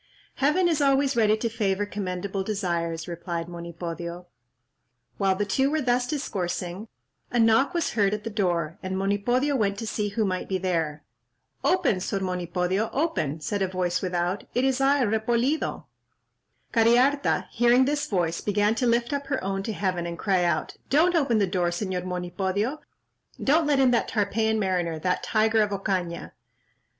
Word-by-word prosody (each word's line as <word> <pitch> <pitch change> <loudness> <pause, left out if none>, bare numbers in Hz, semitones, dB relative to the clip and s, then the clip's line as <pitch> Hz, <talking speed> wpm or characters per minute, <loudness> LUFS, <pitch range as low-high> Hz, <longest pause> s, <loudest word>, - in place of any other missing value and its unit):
"Heaven 300 +7 +3
is 320 -3 +1
always 275 0 +3
ready 215 -2 +3
to 230 - -1
favour 205 -3 0
commendable 195 -1 -3
desires," 170 -5 -2
replied 170 -1 -4
Monipodio. 170 0 -6 0.9
While 195 -2 +2
the 205 +2 -1
two 265 +7 +1
were 310 +1 0
thus 245 -2 +1
discoursing, 195 - -3 0.4
a 245 - -1
knock 230 +8 +4
was 340 - 0
heard 200 -3 +2
at 210 0 -3
the 225 - -5
door, 175 -6 -1
and 190 -1 -3
Monipodio 240 +9 +1
went 200 -5 0
to 225 - -4
see 210 -1 -2
who 215 +1 0
might 185 -1 -2
be 190 - +1
there. 165 -5 -2 0.6
"Open, 340 - +2
Sor 195 +2 -2
Monipodio—open," 180 - -1
said 200 +5 -2
a 190 - +2
voice 180 -1 -1
without; 180 +1 -1
"it 250 - +2
is 265 0 +1
I, 275 0 +4
Repolido." 235 +7 0 0.9
Cariharta 245 +5 +3
hearing 240 +2 +4
this 290 +1 -1
voice, 170 -4 -1
began 205 +1 +2
to 245 +2 0
lift 235 +3 +1
up 280 -1 -3
her 270 -6 -2
own 195 0 -2
to 220 - -4
heaven, 185 -4 -2
and 170 0 -5
cried 190 -3 +1
out, 170 - -1
"Don't 325 +6 +4
open 275 -9 +2
the 205 - +3
door, 180 -1 0
Señor 180 0 -3
Monipodio; 190 - -2 0.6
don't 305 +3 +3
let 285 -2 +3
in 260 -2 +5
that 235 - +2
Tarpeian 220 +1 0
mariner—that 180 -3 0
tiger 220 0 +2
of 210 - +2
Ocaña." 190 -4 -2
205 Hz, 160 wpm, -26 LUFS, 180-245 Hz, 0.9 s, in